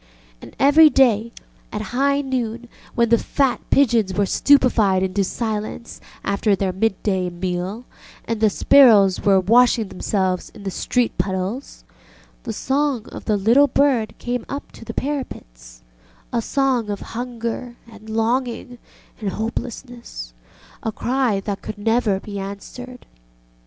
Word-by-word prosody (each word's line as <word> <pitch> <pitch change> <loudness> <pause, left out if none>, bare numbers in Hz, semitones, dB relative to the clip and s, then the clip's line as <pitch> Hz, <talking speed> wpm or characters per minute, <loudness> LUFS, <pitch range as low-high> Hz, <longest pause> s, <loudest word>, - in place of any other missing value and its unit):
And - - -13
every 300 +4 +7
day, 235 -5 +3 0.4
at - - -5
high 280 +2 +2
noon, 245 -3 -3 0.3
when 235 -1 +2
the 235 0 +4
fat 270 -3 0
pigeons 225 -8 +3
were 205 - +2
stupefied 220 -7 +3
into 190 +1 0
silence 220 +3 -4 0.2
after 200 +1 +1
their 190 -1 -2
midday 190 -2 0
meal 180 +5 -4 0.4
and 225 -1 -3
the 215 - +5
sparrows 205 -5 +5
were 195 -2 +4
washing 230 +1 +3
themselves 185 -2 -1
in 205 - -11
the 195 - -3
street 245 +3 -1
puddles, 190 +7 -3 0.6
the 230 - -3
song 270 +1 -1
of - - -10
the 210 -2 +1
little 235 +8 +4
bird 265 -5 +1
came 245 -1 -3
up 280 +1 -6
to - - -13
the - - -7
parapetsŌĆöa - - -6
song 255 -3 0
of 205 -1 -4
hunger 240 0 -5
and 220 -1 -14
longing 240 +2 -2 0.4
and 210 -3 -2
hopelessness, 230 - -6 0.5
a 225 - -2
cry 245 -2 0
that 200 0 -4
could 215 - -7
never 225 -2 +1
be 200 0 -7
answered. 245 +6 -8
225 Hz, 135 wpm, -21 LUFS, 195-250 Hz, 0.6 s, every